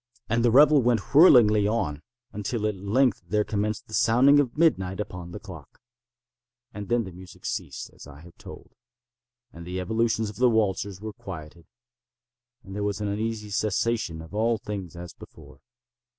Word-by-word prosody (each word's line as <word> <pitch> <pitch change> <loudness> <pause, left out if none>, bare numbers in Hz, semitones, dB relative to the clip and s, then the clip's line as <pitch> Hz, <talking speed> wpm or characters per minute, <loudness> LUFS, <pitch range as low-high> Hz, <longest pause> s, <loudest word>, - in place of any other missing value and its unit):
And 115 +1 0
the 120 - +4
revel 145 +4 +6
went 120 -1 0
whirlingly 115 - +6
on, 75 -10 -2 0.3
until 105 +2 -3
at 105 - 0
length 105 +5 +1
there 105 0 +1
commenced 105 0 -3
the 110 - -14
sounding 125 +6 +5
of 140 -1 -1
midnight 95 - +1
upon 90 -4 -6
the - - -8
clock. - - -12 0.9
And 105 -1 -7
then 120 -1 +2
the 95 - -8
music 90 0 -14
ceased, - - -5
as - - -14
I 70 +1 -13
have 85 +1 -16
told; - - -12 0.8
and 85 - -10
the 90 +2 -5
evolutions 110 +2 0
of 105 - -16
the 125 +1 +4
waltzers 100 -3 -1
were 110 -1 -6
quieted; 85 -7 -10 1.0
and 95 - -11
there 105 - -3
was 100 0 -2
an 105 -1 -2
uneasy 105 0 -3
cessation 105 -5 -1
of 80 - -14
all 115 +2 +1
things 100 -5 -7
as 85 -1 -9
before. - - -15
105 Hz, 170 wpm, -25 LUFS, 95-115 Hz, 1.0 s, revel